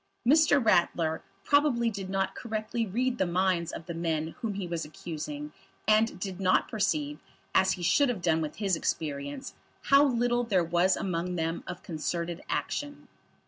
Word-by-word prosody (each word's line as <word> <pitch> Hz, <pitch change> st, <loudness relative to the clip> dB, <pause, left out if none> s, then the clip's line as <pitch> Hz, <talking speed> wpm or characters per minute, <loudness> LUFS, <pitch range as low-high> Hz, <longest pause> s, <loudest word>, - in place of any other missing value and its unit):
Mr. 300 Hz, +1 st, +6 dB
Ratler 170 Hz, -5 st, +2 dB, 0.2 s
probably 280 Hz, -5 st, +3 dB
did 195 Hz, -2 st, -6 dB
not 195 Hz, 0 st, 0 dB
correctly 220 Hz, 0 st, -3 dB
read 245 Hz, +5 st, -1 dB
the 190 Hz, -, +3 dB
minds 175 Hz, -1 st, +1 dB
of 165 Hz, -, -7 dB
the 170 Hz, -, -5 dB
men 160 Hz, -1 st, -1 dB
whom 215 Hz, -4 st, -2 dB
he 195 Hz, -2 st, -3 dB
was 170 Hz, -2 st, -3 dB
accusing, 150 Hz, -1 st, -6 dB, 0.3 s
and 215 Hz, -1 st, +3 dB
did 190 Hz, -1 st, -5 dB
not 185 Hz, -1 st, +3 dB
perceive, 150 Hz, -8 st, -1 dB, 0.3 s
as 190 Hz, 0 st, +4 dB
he 180 Hz, -, -6 dB
should 280 Hz, +10 st, +4 dB
have 210 Hz, -8 st, -3 dB
done 160 Hz, -1 st, +2 dB
with 155 Hz, -1 st, -4 dB
his 195 Hz, -4 st, +1 dB
experience, 145 Hz, -, -3 dB, 0.3 s
how 275 Hz, +1 st, +6 dB
little 245 Hz, -2 st, +2 dB
there 195 Hz, -7 st, +2 dB
was 175 Hz, +2 st, +2 dB
among 180 Hz, -1 st, -2 dB
them 165 Hz, 0 st, -2 dB
of 180 Hz, -, -7 dB
concerted 170 Hz, +1 st, -3 dB
action. 290 Hz, 0 st, -3 dB
185 Hz, 165 wpm, -29 LUFS, 165-225 Hz, 0.3 s, Mr